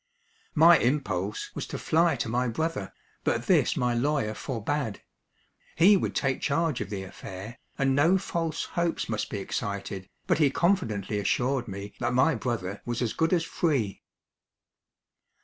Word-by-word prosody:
My 165 +2 +7
impulse 105 -7 -1
was - - -5
to - - -5
fly 165 -1 +2
to 115 - -2
my 125 +3 0
brother, 120 - -2 0.3
but - - 0
this - - +3
my 125 -1 +1
lawyer 120 -3 0
forbade. 125 0 -3 0.7
He 190 +6 +7
would 190 - -1
take 135 -2 0
charge 145 -2 0
of 100 - -4
the 100 -2 -4
affair, 95 +3 -9 0.2
and 135 -1 +2
no 165 +7 +5
false 165 -4 -2
hopes 170 -1 0
must 110 -1 -2
be 105 - -3
excited, 100 -1 -4 0.2
but 175 -4 +2
he 150 -3 +5
confidently 110 - 0
assured 125 +4 0
me 100 0 -7
that 120 +1 0
my 135 +6 +4
brother 105 -6 -3
was 120 +1 -2
as 115 - -1
good 160 0 +1
as 175 -3 +3
free. 140 - -1
125 Hz, 155 wpm, -27 LUFS, 105-160 Hz, 0.7 s, My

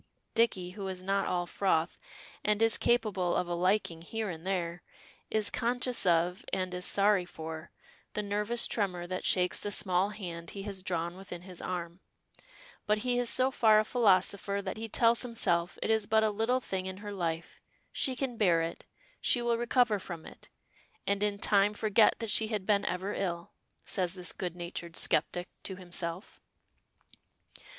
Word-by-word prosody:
Dicky, 190 -6 +2
who 195 0 -6
is 185 -1 -5
not 195 +1 +1
all 175 -1 0
froth, 175 -2 0 0.4
and 210 0 +2
is 225 -1 +4
capable 210 -7 +2
of 180 - 0
a 175 - -2
liking 175 -1 +1
here 220 +3 -3
and 165 +2 -8
there, 175 -2 -2 0.5
is 215 -1 +2
conscious 245 -2 0
of, 175 +1 +2
and 185 -1 -1
is 180 +1 -3
sorry 200 -1 +4
for, 160 -1 -7 0.5
the 210 - -1
nervous 210 +4 0
tremor 185 -5 -1
that 185 +1 -4
shakes 180 -1 +3
the 205 - -3
small 190 -1 +2
hand 170 -5 -7
he 195 - -6
has 200 -2 -5
drawn 175 -1 -2
within 180 -2 -9
his 185 -2 -8
arm; 175 -1 -4 0.9
but 210 0 +3
he 245 -1 +2
is 245 -1 +1
so 260 +1 +4
far 220 -4 +5
a 215 - +1
philosopher 200 -3 +2
that 195 -1 -4
he 225 +1 -5
tells 230 +1 +3
himself 180 -8 +1
it - - +1
is 220 -2 +2
but 220 0 +4
a 215 - +2
little 225 +5 +1
thing 190 -6 -4
in 190 0 -5
her 205 0 -7
life; 170 -3 -3 0.3
she 260 -3 -1
can 250 -2 -3
bear 180 -6 +4
it; 165 +1 -6 0.3
she 245 - +3
will 240 -1 +1
recover 240 -2 +2
from 170 -4 -7
it; - - -13 0.6
"and 200 0 0
in 205 -1 +1
time 205 +1 +3
forget 215 +1 +4
that 225 -2 -2
she 220 - +4
had 210 -3 -3
been 205 -1 +2
ever 190 +3 -2
ill," 170 -3 -3 0.3
says 185 -2 -1
this 180 -2 -3
good 180 -2 -4
natured 170 -1 -6
skeptic 175 0 0
to 190 - -4
himself. 175 0 -6
195 Hz, 175 wpm, -31 LUFS, 180-215 Hz, 0.9 s, far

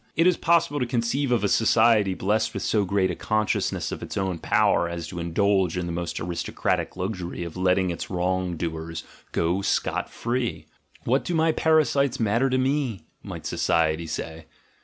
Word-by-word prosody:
It 165 - +3
is 180 -1 +5
possible 165 -4 +2
to 125 - -1
conceive 125 +3 0
of 120 -4 +2
a - - +3
society 110 -2 +3
blessed 105 +4 0
with - - -3
so 105 -2 +1
great 95 -1 +1
a - - -4
consciousness 110 +3 -1
of - - -5
its - - -6
own 95 -3 -1
power 85 - +2
as 85 -1 -5
to 85 - -6
indulge 95 +1 +1
in 90 - -2
the 85 - -4
most 85 0 -3
aristocratic 85 +1 -2
luxury 90 -2 -4
of 85 -2 -7
letting 95 0 +2
its 85 - -5
wrong 90 -1 -1
doers 80 0 -4 0.3
go 85 +4 0
scot 100 - -1
jree. 120 0 -3 0.2
— - - -29
"What 130 +4 +2
do 175 - -2
my 160 0 +3
para 160 -1 +3
sites 140 +1 0
matter 115 +4 +2
to 130 - +1
me?" 130 - -1 0.2
might - - -8
society 80 0 +1
say. 80 0 -6
95 Hz, 185 wpm, -25 LUFS, 85-120 Hz, 0.3 s, is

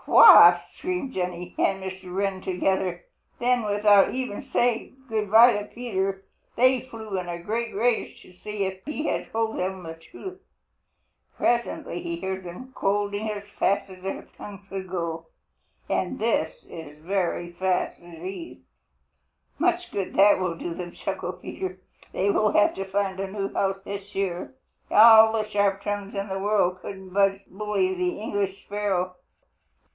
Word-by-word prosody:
"What?" - - +9
screamed 360 -8 -4
Jenny 180 -1 -4
and 195 0 +1
Mr. 190 -1 -7
Wren 195 0 -1
together. 185 -1 -1 0.3
Then 245 0 +2
without 205 0 +4
even 255 -5 -3
saying 240 +1 0
good 215 -3 -2
by 230 +3 +8
to 205 0 -3
Peter, 195 -5 -3 0.3
they 255 +1 +4
flew 220 -6 -6
in 180 -1 -6
a 170 0 -5
great 225 +5 -3
rage 235 +3 0
to 185 - -17
see 205 +2 -4
if 190 0 -5
he 300 +1 -4
had - - -2
told 225 0 -1
them 185 0 -3
the 165 -1 -6
truth. 370 - -11 1.0
Presently 235 -7 -1
he 170 0 -4
heard 190 +1 -4
them 210 +10 -9
scolding 205 0 -1
as 205 -1 -4 0.2
fast 200 0 +1
as 185 -1 -12
their 190 +1 -4
tongues 200 -1 -10
could 190 -1 -6
go, 165 -2 -4 0.6
and - - -1
this - - -1
is 150 -3 -10
very 175 -1 -1
fast 185 +1 -1
indeed. 175 - -9 1.0
"Much 355 +2 +1
good 195 -2 -3
that 200 0 +6
will 180 -2 -1
do 170 +1 -5
them," 175 0 -7
chuckled 185 -2 -5
Peter. 185 0 -5 0.3
"They 200 +2 +1
will 210 0 +2
have 205 - +4
to 195 - -4
find 190 0 -1
a 195 0 -3
new 200 -1 -3
house 195 0 -1
this 200 0 -7
year. 195 +4 -3 0.3
All 220 0 +8
the 215 -1 0
sharp 200 -1 +1
tongues 205 -1 -4
in 200 +1 -2
the 190 0 -3
world 195 -3 +1
couldn't 190 -1 -8
budge 195 0 +3
Bully 195 -1 -1
the 180 0 -2
English 200 -2 -3
sparrow. 195 -3 -1
195 Hz, 160 wpm, -25 LUFS, 185-215 Hz, 1.0 s, What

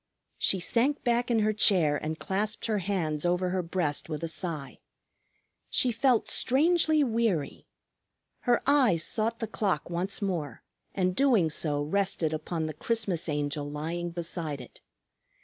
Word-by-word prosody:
She 190 - +3
sank 240 +10 +1
back 240 0 +1
in 230 -2 +2
her 215 0 +2
chair 180 -8 +4
and 155 +1 -4
clasped 205 +5 -2
her 215 -2 0
hands 170 -6 -2
over 180 +1 0
her 185 0 0
breast 165 -4 -2
with 155 0 -4
a - - -1
sigh. 160 -4 -4 0.9
She 250 - +3
felt 240 0 +2
strangely 315 +3 +3
weary. 225 - -1 0.8
Her 240 - +3
eyes 255 - +3
sought 225 +4 +1
the 230 - -3
clock 195 -6 -2
once 180 +3 -2
more, 170 - -3 0.3
and 185 -1 0
doing 230 - +3
so 145 -1 0
rested 170 -1 0
upon 160 +1 -3
the 155 - -4
Christmas 195 -2 0
Angel 145 0 -2
lying 165 +4 -4
beside 165 -3 -3
it. 125 - -13
180 Hz, 150 wpm, -28 LUFS, 155-225 Hz, 0.9 s, chair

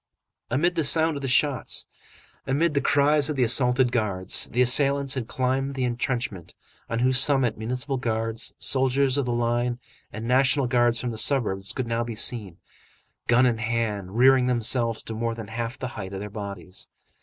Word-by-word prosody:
Amid 165 +9 +1
the 165 - -1
sound 160 +2 +1
of 140 - -5
the 135 - -3
shots, 135 -1 +1 0.6
amid 150 +4 +1
the 140 - +1
cries 145 +1 +3
of 150 - -2
the 130 - +1
assaulted 125 +1 +3
guards, 100 -6 0
the 125 +3 +1
assailants 140 +2 +3
had 130 -4 -4
climbed 135 +1 -2
the 130 - -2
entrenchment, 120 -6 -3 0.3
on 115 - -2
whose 130 +2 +3
summit 135 -4 +2
Municipal 125 +5 -2
Guards, 115 -1 -1
soldiers 135 0 +1
of 140 -2 0
the - - -1
line 120 +1 -1 0.3
and 110 +2 -6
National 135 +2 +2
Guards 120 -1 +1
from 125 - -3
the 110 - -5
suburbs 100 -9 0
could 130 - -3
now 115 0 -1
be 115 -1 -6
seen, 105 -5 0 0.7
gun 125 +2 +4
in 120 -3 +1
hand, 110 -4 -3
rearing 130 0 +5
themselves 120 -1 0
to 115 - -6
more 115 +1 -3
than 110 -3 -8
half 115 +2 -5
the 130 - -5
height 100 -5 -8
of 95 - -5
their 105 0 -7
bodies. 100 -3 -8
125 Hz, 180 wpm, -24 LUFS, 115-135 Hz, 0.7 s, rearing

